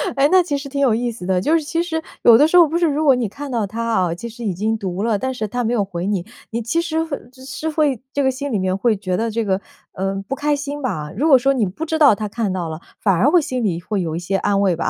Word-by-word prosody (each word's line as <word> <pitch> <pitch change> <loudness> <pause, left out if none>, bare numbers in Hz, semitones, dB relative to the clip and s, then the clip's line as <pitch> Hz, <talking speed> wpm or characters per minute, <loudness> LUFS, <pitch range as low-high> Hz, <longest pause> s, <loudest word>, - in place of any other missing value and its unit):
哎， 275 +1 +4
那 370 - +6
其 290 -5 -2
实 280 0 -7
挺 280 +1 -4
有 270 -5 +3
意 240 +1 -1
思 220 -6 -9
的， 185 -1 +1
就 300 - +1
是 320 - -3
其 330 +3 -1
实 320 -2 -3 0.2
有 230 -1 +8
的 295 - +5
时 330 - 0
候 345 - +8
不 320 +3 -1
是 345 - +2
如 305 -1 0
果 275 -4 +5
你 245 -3 -1
看 285 +8 -8
到 225 -4 -1
他 225 +4 -4
啊， 185 -7 0
其 235 +7 -7
实 235 +1 -10
已 200 - 0
经 215 +5 -1
读 190 -1 -3
了， 225 -2 +1
但 260 +5 -2
是 220 -4 -3
他 245 +4 -2
没 230 +1 0
有 220 -4 +2
回 180 -2 -5
你， 195 -4 -1 0.3
你 230 +1 -2
其 285 +9 0
实 325 -1 -1
会 315 -4 -4
其 260 - -18
实 290 +4 -4
会 300 -5 +1
这 285 - +1
个 265 - +3
心 280 +2 -5
里 215 - 0
面 185 0 0
会 225 +2 +2
觉 185 -2 -2
得 230 +1 -1
这 225 +1 -1
个， 190 -2 0 0.3
呃， 195 +1 -2
不 275 - -2
开 295 +1 0
心 285 +1 -5
吧。 150 - -3
如 285 +10 +1
果 275 -4 +8
说 270 +3 +2
你 245 -5 +1
不 200 - -5
知 320 0 -1
道 285 -8 +7
他 215 +1 -4
看 210 -3 -2
到 175 -3 -3
了， 160 0 -6 0.2
反 195 - +3
而 195 +11 +3
会 355 +2 +5
心 255 -4 -3
里 175 -5 -1
会 200 +1 -2
有 160 -2 -3
一 - - -2
些 190 +3 -1
安 200 0 +1
慰 190 -3 +2
吧。 165 - -1
235 Hz, 340 characters per minute, -20 LUFS, 195-285 Hz, 0.3 s, 有